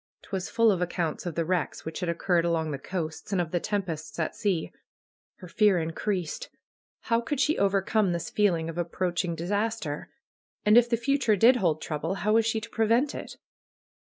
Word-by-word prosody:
Twas 190 Hz, -2 st, -4 dB
full 230 Hz, -1 st, +4 dB
of 185 Hz, -3 st, -1 dB
accounts 175 Hz, -1 st, -2 dB
of 170 Hz, -, -4 dB
the 165 Hz, -, 0 dB
wrecks 180 Hz, -2 st, -2 dB
which 160 Hz, -, -5 dB
had 180 Hz, -2 st, -2 dB
occurred 170 Hz, 0 st, +1 dB
along 165 Hz, -2 st, 0 dB
the 140 Hz, -, -4 dB
coasts, 160 Hz, -2 st, -5 dB
and 195 Hz, -, +1 dB
of 170 Hz, -2 st, -1 dB
the 175 Hz, -, +1 dB
tempests 170 Hz, -6 st, -3 dB
at 160 Hz, -, -2 dB
sea. 185 Hz, -6 st, -1 dB, 0.6 s
Her 180 Hz, -, -11 dB
fear 205 Hz, +1 st, +3 dB
increased. 170 Hz, +1 st, -2 dB, 0.5 s
How 230 Hz, 0 st, +1 dB
could 255 Hz, +4 st, -3 dB
she 300 Hz, +2 st, +3 dB
overcome 195 Hz, 0 st, +2 dB
this 170 Hz, -2 st, -3 dB
feeling 175 Hz, -6 st, +2 dB
of 165 Hz, +1 st, -5 dB
approaching 175 Hz, 0 st, -1 dB
disaster? 200 Hz, -2 st, -2 dB, 0.6 s
And 210 Hz, +1 st, +6 dB
if 240 Hz, 0 st, +6 dB
the 235 Hz, -, +2 dB
future 240 Hz, -2 st, +2 dB
did 235 Hz, +6 st, +6 dB
hold 160 Hz, -7 st, 0 dB
trouble, 160 Hz, +4 st, -2 dB
how 210 Hz, +2 st, 0 dB
was 225 Hz, 0 st, +4 dB
she 225 Hz, 0 st, +1 dB
to 230 Hz, -, -8 dB
prevent 230 Hz, +6 st, +2 dB
it? -, -, -8 dB
185 Hz, 185 wpm, -27 LUFS, 170-220 Hz, 0.6 s, And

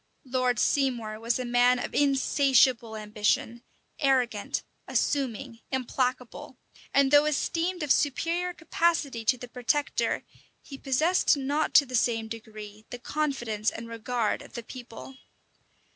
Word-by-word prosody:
Lord 255 Hz, -1 st, 0 dB
Seymour 235 Hz, -5 st, 0 dB
was 230 Hz, +1 st, 0 dB
a 255 Hz, -, -4 dB
man 245 Hz, +1 st, +4 dB
of 245 Hz, -, -5 dB
insatiable 265 Hz, -4 st, +3 dB
ambition; 215 Hz, +2 st, -1 dB, 0.4 s
arrogant, 255 Hz, -7 st, 0 dB, 0.2 s
assuming, 260 Hz, -3 st, -1 dB
implacable; 255 Hz, -1 st, -3 dB, 0.3 s
and 275 Hz, -1 st, +3 dB
though 290 Hz, 0 st, +6 dB
esteemed 330 Hz, +4 st, -1 dB
of 295 Hz, -, -1 dB
superior 335 Hz, +5 st, +1 dB
capacity 320 Hz, -7 st, 0 dB
to 250 Hz, +3 st, +2 dB
the 245 Hz, -, -9 dB
protector, 255 Hz, +4 st, -1 dB, 0.4 s
he 275 Hz, -2 st, -10 dB
possessed 305 Hz, +5 st, +2 dB
not 285 Hz, +3 st, -1 dB
to 285 Hz, -, +8 dB
the 255 Hz, -, -11 dB
same 225 Hz, -1 st, +1 dB
degree 215 Hz, -2 st, -9 dB
the 245 Hz, -, -6 dB
confidence 240 Hz, -6 st, -2 dB
and 230 Hz, +1 st, -8 dB
regard 230 Hz, 0 st, -2 dB
of -, -, -14 dB
the 235 Hz, -, -6 dB
people. 250 Hz, +2 st, -10 dB
255 Hz, 130 wpm, -27 LUFS, 230-280 Hz, 0.4 s, to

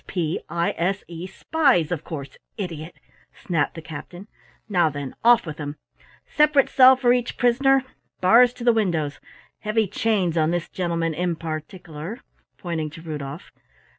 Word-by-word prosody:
"S -, -, -36 dB
p 170 Hz, -3 st, -2 dB
i 170 Hz, 0 st, 0 dB
s 190 Hz, +4 st, 0 dB
e, 170 Hz, +1 st, -7 dB
spies, 250 Hz, -, +1 dB
of 165 Hz, -3 st, -2 dB
course, 140 Hz, -5 st, -7 dB, 0.2 s
idiot!" 170 Hz, -5 st, -6 dB, 0.5 s
snapped 165 Hz, -5 st, 0 dB
the 165 Hz, -, -8 dB
captain. 165 Hz, +4 st, -9 dB, 0.4 s
"Now 180 Hz, -6 st, +2 dB
then, 145 Hz, -2 st, -6 dB
off 240 Hz, -2 st, +6 dB
with 155 Hz, -2 st, -7 dB
'em. 145 Hz, 0 st, -5 dB, 0.5 s
Separate 300 Hz, -2 st, +3 dB
cell 260 Hz, 0 st, +7 dB
for 250 Hz, -2 st, +3 dB
each 245 Hz, -1 st, -2 dB
prisoner, 265 Hz, +2 st, +3 dB, 0.4 s
bars 235 Hz, +7 st, +6 dB
to 245 Hz, -, -9 dB
the 240 Hz, -1 st, +5 dB
windows. 165 Hz, -10 st, -1 dB, 0.4 s
Heavy 215 Hz, 0 st, 0 dB
chains 190 Hz, -5 st, 0 dB
on 155 Hz, 0 st, +2 dB
this 175 Hz, 0 st, -2 dB
gentleman 170 Hz, -2 st, -1 dB
in 175 Hz, +2 st, -1 dB
particeler," 160 Hz, -, -7 dB, 0.4 s
pointing 165 Hz, -4 st, -3 dB
to 155 Hz, +2 st, -12 dB
Rudolf. 150 Hz, -1 st, -7 dB
175 Hz, 155 wpm, -23 LUFS, 160-225 Hz, 0.5 s, cell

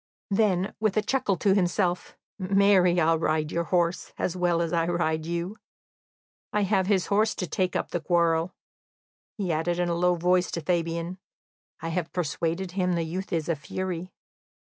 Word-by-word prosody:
Then, 195 Hz, -2 st, +2 dB
with 215 Hz, -1 st, +1 dB
a 215 Hz, -, +3 dB
chuckle 215 Hz, -5 st, 0 dB
to 195 Hz, +3 st, +3 dB
himself: 180 Hz, -1 st, 0 dB, 0.2 s
"Marry, 190 Hz, -2 st, +4 dB
I'll 165 Hz, 0 st, +3 dB
ride 155 Hz, -1 st, 0 dB
your 170 Hz, 0 st, -1 dB
horse, 175 Hz, 0 st, 0 dB
as 180 Hz, -, -1 dB
well 175 Hz, -2 st, +1 dB
as 170 Hz, 0 st, -1 dB
I 165 Hz, -1 st, +1 dB
ride 160 Hz, -2 st, 0 dB
you!... 170 Hz, +5 st, -3 dB, 0.9 s
I 210 Hz, -, +1 dB
have 195 Hz, -2 st, +2 dB
his 195 Hz, -3 st, +2 dB
horse 215 Hz, +2 st, +3 dB
to 180 Hz, -, -2 dB
take 180 Hz, +1 st, -1 dB
up -, -, -2 dB
the 175 Hz, -, -2 dB
quarrel," 170 Hz, 0 st, +1 dB, 0.8 s
he 190 Hz, -5 st, -1 dB
added 165 Hz, +2 st, 0 dB
in 175 Hz, 0 st, 0 dB
a -, -, +1 dB
low 180 Hz, +1 st, +3 dB
voice 180 Hz, +1 st, +2 dB
to 170 Hz, -, -2 dB
Fabian. 170 Hz, +2 st, -1 dB, 0.6 s
"I 165 Hz, -, -3 dB
have 165 Hz, 0 st, -2 dB
persuaded 170 Hz, +2 st, -2 dB
him 180 Hz, -1 st, 0 dB
the 170 Hz, -1 st, 0 dB
youth 180 Hz, +4 st, -5 dB
is 160 Hz, -3 st, -1 dB
a 170 Hz, -, +1 dB
fury." 180 Hz, +4 st, -5 dB
175 Hz, 175 wpm, -26 LUFS, 170-185 Hz, 0.9 s, Marry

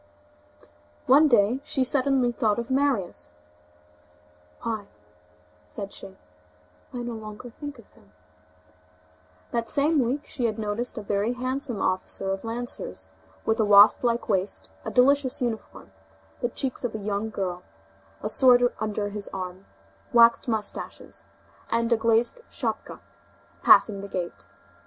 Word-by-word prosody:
One 290 Hz, +3 st, +6 dB
day 235 Hz, -1 st, +3 dB
she 265 Hz, -, 0 dB
suddenly 260 Hz, -1 st, +2 dB
thought 215 Hz, -2 st, 0 dB
of 235 Hz, +2 st, -4 dB
Marius: 260 Hz, -, -1 dB, 1.3 s
"Why!" 220 Hz, -3 st, -3 dB, 0.8 s
said 200 Hz, -3 st, -7 dB
she, 190 Hz, -, -11 dB, 0.7 s
"I 245 Hz, -1 st, -5 dB
no 240 Hz, 0 st, -4 dB
longer 220 Hz, +2 st, -9 dB
think 290 Hz, +3 st, -8 dB
of 230 Hz, -, -15 dB
him." -, -, -24 dB, 1.4 s
That 235 Hz, -1 st, -2 dB
same 295 Hz, +2 st, +2 dB
week, 265 Hz, +5 st, -2 dB
she 240 Hz, -5 st, -1 dB
noticed 220 Hz, +3 st, -3 dB
a 215 Hz, -, -4 dB
very 205 Hz, +3 st, 0 dB
handsome 255 Hz, -3 st, -2 dB
officer 185 Hz, +1 st, -1 dB
of 195 Hz, 0 st, -3 dB
lancers, 240 Hz, -, -6 dB, 0.4 s
with 220 Hz, +1 st, +1 dB
a -, -, +4 dB
wasp 205 Hz, +2 st, +7 dB
like 235 Hz, -1 st, 0 dB
waist, 195 Hz, -2 st, -1 dB
a -, -, -4 dB
delicious 260 Hz, +3 st, +3 dB
uniform, 235 Hz, -3 st, -5 dB, 0.5 s
the 240 Hz, -, -1 dB
cheeks 260 Hz, +1 st, -2 dB
of 235 Hz, -3 st, -2 dB
a -, -, -1 dB
young 205 Hz, +1 st, -2 dB
girl, 185 Hz, -4 st, -3 dB, 0.6 s
a -, -, 0 dB
sword 245 Hz, 0 st, +5 dB
under 210 Hz, -1 st, -2 dB
his 205 Hz, 0 st, -3 dB
arm, 185 Hz, 0 st, -7 dB, 0.4 s
waxed 235 Hz, +1 st, +5 dB
moustaches, 210 Hz, -, -4 dB, 0.4 s
and 230 Hz, +1 st, +1 dB
a -, -, +5 dB
glazed 230 Hz, -, +2 dB
schapka, -, -, -4 dB, 0.6 s
passing 200 Hz, -3 st, +5 dB
the 200 Hz, -, -7 dB
gate. 175 Hz, -, -5 dB
230 Hz, 135 wpm, -26 LUFS, 205-250 Hz, 1.4 s, wasp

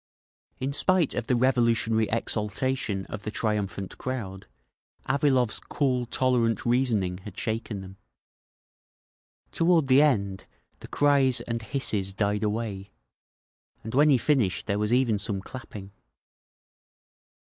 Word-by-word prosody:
In 135 Hz, +2 st, -2 dB
spite 180 Hz, 0 st, +2 dB
of 120 Hz, -, -4 dB
the 125 Hz, -, +2 dB
revolutionary 115 Hz, -3 st, +2 dB
exaltation 110 Hz, -1 st, -1 dB
of 105 Hz, -, -7 dB
the 110 Hz, -, -5 dB
triumphant 105 Hz, -3 st, -3 dB
crowd, 105 Hz, -7 st, -5 dB, 0.6 s
Avilov's 130 Hz, -5 st, +2 dB
cool 125 Hz, -4 st, -1 dB
tolerant 120 Hz, -3 st, +1 dB
reasoning 115 Hz, -7 st, +2 dB
had 100 Hz, +2 st, -11 dB
shaken 110 Hz, -3 st, -3 dB
them. 95 Hz, 0 st, -11 dB, 1.5 s
Toward 165 Hz, -2 st, +3 dB
the 135 Hz, +1 st, +5 dB
end, 100 Hz, -10 st, +1 dB, 0.3 s
the -, -, -10 dB
cries 140 Hz, -3 st, +3 dB
and 115 Hz, -1 st, -4 dB
hisses 105 Hz, -5 st, -2 dB
died 100 Hz, 0 st, 0 dB
away, 105 Hz, -2 st, -3 dB, 0.9 s
and 110 Hz, -, -7 dB
when 145 Hz, +3 st, +5 dB
he 135 Hz, -, +5 dB
finished 120 Hz, -8 st, +1 dB
there 100 Hz, -1 st, -1 dB
was 105 Hz, +1 st, -1 dB
even 120 Hz, -4 st, +2 dB
some 100 Hz, -1 st, -1 dB
clapping. 100 Hz, -2 st, -10 dB
115 Hz, 120 wpm, -26 LUFS, 105-130 Hz, 1.5 s, the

